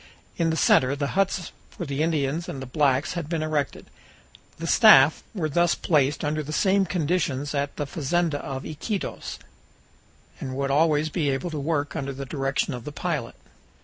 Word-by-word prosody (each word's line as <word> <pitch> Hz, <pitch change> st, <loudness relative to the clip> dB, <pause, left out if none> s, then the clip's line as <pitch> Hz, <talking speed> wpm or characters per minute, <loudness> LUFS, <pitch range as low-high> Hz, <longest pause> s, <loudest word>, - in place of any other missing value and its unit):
In 165 Hz, -1 st, +1 dB
the 160 Hz, -, 0 dB
center 130 Hz, -2 st, +4 dB
the 140 Hz, -1 st, -2 dB
huts 195 Hz, -2 st, 0 dB, 0.2 s
for 175 Hz, -, -7 dB
the 140 Hz, 0 st, -2 dB
Indians 155 Hz, 0 st, 0 dB
and 135 Hz, -, -5 dB
the 135 Hz, -, -6 dB
blacks 140 Hz, 0 st, +1 dB
had 170 Hz, -4 st, -4 dB
been 165 Hz, -2 st, -1 dB
erected. 150 Hz, -3 st, -2 dB, 0.7 s
The -, -, -5 dB
staff -, -, +7 dB
were 165 Hz, -6 st, -1 dB
thus 170 Hz, +3 st, +2 dB
placed 145 Hz, -2 st, +1 dB
under 155 Hz, +1 st, -1 dB
the 150 Hz, 0 st, -7 dB
same 195 Hz, +4 st, +2 dB
conditions 155 Hz, -4 st, -1 dB
as 145 Hz, -1 st, 0 dB
at 145 Hz, -, -20 dB
the 145 Hz, -, -2 dB
fazenda 155 Hz, +2 st, -1 dB
of 135 Hz, -1 st, -6 dB
Iquitos, 185 Hz, +6 st, -4 dB, 1.0 s
and 130 Hz, -1 st, -5 dB
would 140 Hz, 0 st, -1 dB
always 155 Hz, +1 st, +3 dB
be 150 Hz, -2 st, 0 dB
able 140 Hz, +6 st, -2 dB
to 155 Hz, -, -3 dB
work 145 Hz, 0 st, -1 dB
under 140 Hz, 0 st, -3 dB
the 135 Hz, +1 st, -6 dB
direction 135 Hz, -1 st, -1 dB
of 125 Hz, -2 st, -6 dB
the 150 Hz, -, -6 dB
pilot. 150 Hz, -6 st, -3 dB
150 Hz, 180 wpm, -25 LUFS, 140-165 Hz, 1.0 s, staff